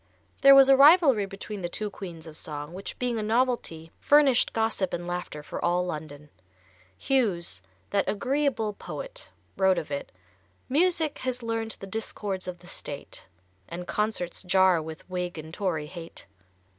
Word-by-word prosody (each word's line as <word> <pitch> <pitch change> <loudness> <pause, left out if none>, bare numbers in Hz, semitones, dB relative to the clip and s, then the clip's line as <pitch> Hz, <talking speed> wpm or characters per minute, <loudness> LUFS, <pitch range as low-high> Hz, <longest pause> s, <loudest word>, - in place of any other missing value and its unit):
There 275 0 +9
was 270 -1 +8
a 270 - +7
rivalry 275 - +6
between 195 +1 -7
the 175 - -3
two 210 +3 -3
queens 170 -5 -8
of 160 -2 -10
song, 150 +1 -5
which 190 +2 -6
being 245 -2 -1
a - - -1
novelty, 220 -8 0
furnished 285 -4 +5
gossip 220 -4 0
and 175 - -3
laughter 175 -4 -5
for - - -6
all 175 +1 +2
London. 150 -3 -7 0.7
Hughes, 185 - +1 0.3
that 200 -1 +1
"agreeable 250 -1 0
poet," - - -7 0.3
wrote 190 -1 +4
of 150 - -4
it: 140 - -4 0.6
_"Music 320 0 +2
has 255 -1 -3
learned 225 -1 -2
the - - -7
discords 195 -2 -4
of 180 -1 -5
the 175 - -19
State, - - -6 0.4
And 175 +1 -6
concerts 210 -5 -2
jar 185 -2 +4
with 160 0 -9
Whig 180 -2 -3
and 160 +1 -8
Tory 170 -6 -1
hate." 165 - -9
195 Hz, 155 wpm, -27 LUFS, 170-245 Hz, 0.7 s, There